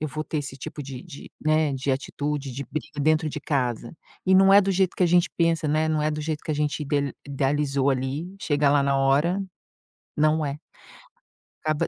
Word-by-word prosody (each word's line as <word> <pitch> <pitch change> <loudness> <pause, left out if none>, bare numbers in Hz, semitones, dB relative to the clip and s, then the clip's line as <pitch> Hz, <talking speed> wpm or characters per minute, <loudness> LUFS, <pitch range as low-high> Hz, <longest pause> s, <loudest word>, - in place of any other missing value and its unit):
eu 155 - -2
vou 155 +2 -4
ter 155 - -3
esse 135 -2 -5
tipo 145 +2 -7
de 130 -1 -8
de 150 -5 -11
né, 155 -1 +2
de 135 +1 -2
atitude, 145 0 -3
de 140 +2 -5
briga 150 -1 -5
dentro 155 +2 +2
de 150 0 -5
casa", 125 -6 -2 0.3
e 190 - +5
não 195 +1 +6
é 200 - +9
do 195 0 0
jeito 190 -1 +1
que - - +1
a - - +4
gente 175 0 +4
pensa, 165 -1 +2
né, 155 +1 +1
não 155 -1 +1
é 155 - +1
do 150 0 -3
jeito 155 0 -4
que 155 - -1
a - - -1
gente 150 +1 -1
ide 140 -1 -1
idealizou 140 0 0
ali, 135 +7 -2
chega 145 -2 +2
lá 145 -1 +4
na 140 0 +1
hora, 145 +8 +2 0.7
não 155 0 +2
é. 140 +1 -4 1.1
Acaba 155 -1 0
150 Hz, 210 wpm, -25 LUFS, 140-155 Hz, 1.1 s, é